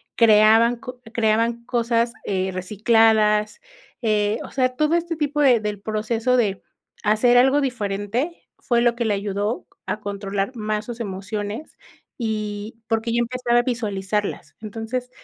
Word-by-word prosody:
creaban 225 Hz, +1 st, +5 dB
con 250 Hz, +1 st, -9 dB
creaban 230 Hz, +1 st, +1 dB
cosas, 235 Hz, -1 st, +1 dB
eh, 190 Hz, -1 st, -1 dB
recicladas, 210 Hz, +2 st, +2 dB, 0.4 s
eh, 215 Hz, -1 st, +1 dB
o -, -, -9 dB
sea, 255 Hz, -1 st, +2 dB
todo 305 Hz, +4 st, +2 dB
este 340 Hz, 0 st, -1 dB
tipo 295 Hz, -1 st, -1 dB
de 255 Hz, -5 st, +5 dB
del 210 Hz, -2 st, -4 dB
proceso 225 Hz, +4 st, 0 dB
de 200 Hz, -5 st, 0 dB, 0.4 s
hacer 220 Hz, +4 st, +4 dB
algo 270 Hz, +3 st, +5 dB
diferente 230 Hz, -, -3 dB
fue 235 Hz, -1 st, +1 dB
lo 240 Hz, -1 st, +3 dB
que 235 Hz, -1 st, -2 dB
le 215 Hz, -, +2 dB
ayudó 205 Hz, +2 st, -2 dB, 0.2 s
a 215 Hz, -, -3 dB
controlar 200 Hz, +3 st, -3 dB
más 215 Hz, -1 st, -2 dB
sus 240 Hz, -1 st, -7 dB
emociones 205 Hz, +5 st, -5 dB, 0.4 s
y 215 Hz, -1 st, -4 dB
porque 225 Hz, 0 st, 0 dB
ya 235 Hz, -, +2 dB
empezaba 240 Hz, 0 st, +1 dB
a -, -, +1 dB
visualizarlas. 210 Hz, -4 st, -3 dB
Entonces, 225 Hz, +3 st, -5 dB
225 Hz, 140 wpm, -22 LUFS, 210-240 Hz, 0.4 s, creaban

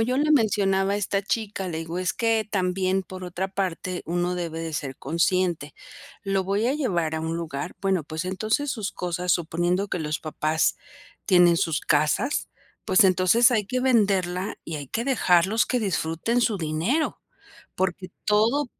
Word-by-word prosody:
yo 250 Hz, +3 st, +1 dB
le 305 Hz, +2 st, +2 dB
mencionaba 200 Hz, -6 st, +2 dB
a -, -, +1 dB
esta 200 Hz, 0 st, -1 dB
chica, 205 Hz, -2 st, -2 dB
le 160 Hz, -2 st, -3 dB
digo: 165 Hz, +2 st, -4 dB
"Es 185 Hz, -1 st, 0 dB
que 225 Hz, -1 st, +1 dB
también, 190 Hz, -1 st, 0 dB
por 185 Hz, 0 st, -9 dB
otra 180 Hz, +2 st, -3 dB
parte, 185 Hz, -2 st, -3 dB
uno 175 Hz, +1 st, -1 dB
debe 165 Hz, -2 st, -4 dB
de 165 Hz, -1 st, -5 dB
ser 135 Hz, -3 st, -4 dB
consciente, 165 Hz, -1 st, 0 dB, 0.5 s
¿lo 195 Hz, -1 st, 0 dB
voy 205 Hz, +5 st, 0 dB
a 275 Hz, -, +1 dB
llevar 175 Hz, -, -1 dB
a -, -, -2 dB
un 160 Hz, +1 st, -2 dB
lugar?, 165 Hz, 0 st, -5 dB
bueno, 190 Hz, -5 st, 0 dB
pues, 160 Hz, +3 st, -5 dB
entonces 215 Hz, +9 st, -1 dB
sus 215 Hz, -6 st, -3 dB
cosas 180 Hz, 0 st, -1 dB
'suponiendo 175 Hz, +3 st, 0 dB
que -, -, -2 dB
los 155 Hz, 0 st, -3 dB
papás 155 Hz, 0 st, 0 dB, 0.5 s
tienen 175 Hz, -3 st, +5 dB
sus 165 Hz, -2 st, 0 dB
casas', 155 Hz, -, +1 dB, 0.4 s
pues, 185 Hz, -, +5 dB
entonces 190 Hz, +6 st, +5 dB
hay 215 Hz, -5 st, +1 dB
que 255 Hz, +2 st, -1 dB
venderla 200 Hz, -6 st, +1 dB
y 160 Hz, -, -5 dB
hay 145 Hz, -2 st, -6 dB
que 230 Hz, -, -3 dB
dejarlos 210 Hz, -4 st, +3 dB
que 250 Hz, -2 st, 0 dB
disfruten 190 Hz, +4 st, 0 dB
su 225 Hz, -4 st, +1 dB
dinero". 170 Hz, -, -1 dB, 0.6 s
Porque 185 Hz, 0 st, -1 dB, 0.2 s
todo 225 Hz, +7 st, +2 dB
185 Hz, 170 wpm, -25 LUFS, 170-215 Hz, 0.6 s, tienen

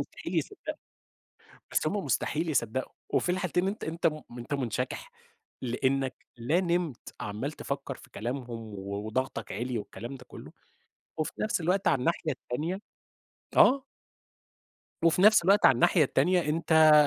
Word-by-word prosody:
مستحيل -, -, -6 dB
يصدقوا، 410 Hz, -, -2 dB, 1.0 s
بس -, -, +1 dB
هُم -, -, 0 dB
مستحيل 155 Hz, +5 st, 0 dB
يصدقوا، 130 Hz, -3 st, 0 dB, 0.2 s
وفي -, -, +1 dB
الحالتين 180 Hz, 0 st, 0 dB
أنت 205 Hz, +3 st, -3 dB
أنت 165 Hz, +1 st, 0 dB
م 155 Hz, -2 st, -3 dB, 0.2 s
أنت 120 Hz, +4 st, -5 dB
منشكح؛ 130 Hz, -, -2 dB, 0.5 s
لأنك 130 Hz, +2 st, 0 dB, 0.2 s
لا 125 Hz, +9 st, +2 dB
نمت، 175 Hz, -7 st, -1 dB
عَمّال 105 Hz, +8 st, -3 dB
تفكر 140 Hz, -2 st, -4 dB
في -, -, -15 dB
كلامهم 125 Hz, +4 st, -4 dB
و 105 Hz, -3 st, -5 dB
وضغطك 130 Hz, +5 st, -2 dB
عِلِي 125 Hz, 0 st, -2 dB
والكلام 110 Hz, +4 st, -6 dB
ده 125 Hz, -1 st, -12 dB
كله، -, -, -11 dB, 0.7 s
وفي 155 Hz, -, -1 dB
نفس 215 Hz, -4 st, 0 dB
الوقت 185 Hz, +4 st, +1 dB
على -, -, +3 dB
الناحية 165 Hz, +3 st, 0 dB
التانية 155 Hz, +9 st, -3 dB, 0.8 s
آه. 270 Hz, 0 st, +6 dB, 1.2 s
وفي 165 Hz, +1 st, +4 dB
نفس 215 Hz, -1 st, +7 dB
الوقت 200 Hz, +4 st, +5 dB
على -, -, +8 dB
الناحية 155 Hz, +7 st, +5 dB
التانية، 175 Hz, +7 st, +3 dB
أنت- 160 Hz, 0 st, +5 dB
145 Hz, 140 wpm, -29 LUFS, 125-175 Hz, 1.2 s, على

